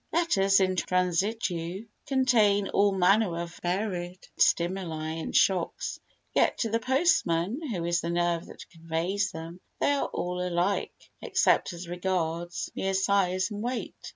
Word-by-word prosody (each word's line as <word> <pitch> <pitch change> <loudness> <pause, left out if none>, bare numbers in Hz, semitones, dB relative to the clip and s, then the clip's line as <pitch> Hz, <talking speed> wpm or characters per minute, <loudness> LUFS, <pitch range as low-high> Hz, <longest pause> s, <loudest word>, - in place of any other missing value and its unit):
Letters 195 - +3
in 185 -1 +1
transitu 180 +1 -1 0.2
contain 225 -7 +3
all 200 0 +3
manner 195 -1 +3
of 170 0 -6
varied 180 -1 -3
stimuli 170 -3 +1
and 160 0 -5
shocks, 185 -3 +1 0.3
yet - - +2
to 225 - -1
the 230 - +1
postman, 250 - +1
who 180 -7 -3
is 170 0 +1
the 170 - -3
nerve 175 -1 0
that - - -11
conveys 170 +4 -2
them, 165 +2 -8 0.2
they - - +2
are 285 - 0
all 180 0 -3
alike, 180 +2 -2
except - - +2
as 175 +1 -8
regards 175 -1 -2
mere 195 0 -1
size 190 0 +1
and 205 0 -5
weight. 245 +2 -3
185 Hz, 140 wpm, -28 LUFS, 170-205 Hz, 0.3 s, Letters